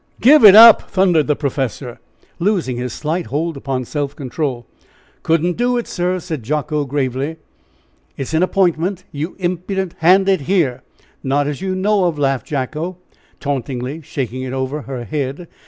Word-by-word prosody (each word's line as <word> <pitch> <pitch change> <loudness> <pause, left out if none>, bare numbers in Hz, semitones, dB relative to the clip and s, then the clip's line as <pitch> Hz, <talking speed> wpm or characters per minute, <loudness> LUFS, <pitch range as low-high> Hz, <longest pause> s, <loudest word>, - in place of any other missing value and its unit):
"Give 285 +3 +6
it 205 -2 +10
up!" 230 0 +9
thundered 180 -6 +2
the 150 - +2
professor, 135 -3 -4 0.4
losing 175 - 0
his 125 0 -4
slight 160 +7 -3
hold 160 +3 -2
upon 135 -2 -3
self 145 +1 -4
control. 130 -3 -4 0.6
"Couldn't 165 +2 0
do 245 +1 +1
it, 240 - -2
sir," 180 +1 -2
said 160 -5 -5
Jacko, 150 +4 -2
gravely. 135 +1 -2 0.8
"It - - -3
is 135 - -7
an 160 - +2
appointment, 185 0 0
you 150 +4 -5
impudent! 185 0 -3
Hand 185 +4 +4
it 190 -5 +2
here." 165 -11 +1 0.4
"Not 140 +2 +1
as 145 +3 -4
you 190 -1 -2
know 195 0 +1
of!" 170 -3 -1
laughed 135 -4 -1
Jacko, 155 +6 -3 0.4
tauntingly 135 +1 -4
shaking 130 -4 -5
it 130 0 -5
over 135 +3 -3
her 125 -1 -6
head. 140 - -4
150 Hz, 160 wpm, -18 LUFS, 135-180 Hz, 0.8 s, it